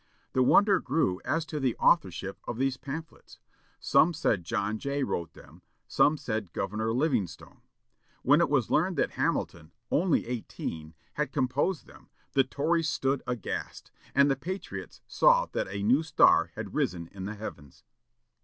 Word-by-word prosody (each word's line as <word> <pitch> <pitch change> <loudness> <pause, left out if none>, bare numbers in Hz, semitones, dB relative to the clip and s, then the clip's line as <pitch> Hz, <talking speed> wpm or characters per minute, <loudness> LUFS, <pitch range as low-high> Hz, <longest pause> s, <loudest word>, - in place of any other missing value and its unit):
The 130 - +2
wonder 195 +9 +5
grew 125 - 0
as 160 0 -1
to 155 -1 -4
the 130 -4 0
authorship 95 - +1
of 115 - -4
these 135 0 0
pamphlets. 155 +5 -9 0.4
Some 170 +2 +4
said 110 - 0
John 105 +3 -2
Jay 140 +2 -2
wrote 85 -9 -3
them; - - -16 0.3
some 150 +2 +3
said 110 - -4
Governor 105 +3 -2
Livingstone. 125 - -2 0.6
When - - +5
it - - +2
was - - +1
learned - - +2
that - - +1
Hamilton, 80 +2 -2 0.2
only 175 0 +2
eighteen, 80 -9 -6 0.2
had 150 -2 -2
composed 140 +6 0
them, - - -18 0.2
the 135 - +4
Tories 160 +5 0
stood 135 -4 0
aghast, 125 -5 -5 0.2
and 140 +1 +6
the 135 - +2
Patriots 185 +9 -7
saw - - +4
that - - -2
a 100 +1 -4
new 125 +8 +4
star 160 - +4
had - - -6
risen 85 -1 -1
in 95 -1 -7
the 105 +2 -5
heavens. 75 -10 -9
130 Hz, 155 wpm, -28 LUFS, 100-155 Hz, 0.6 s, and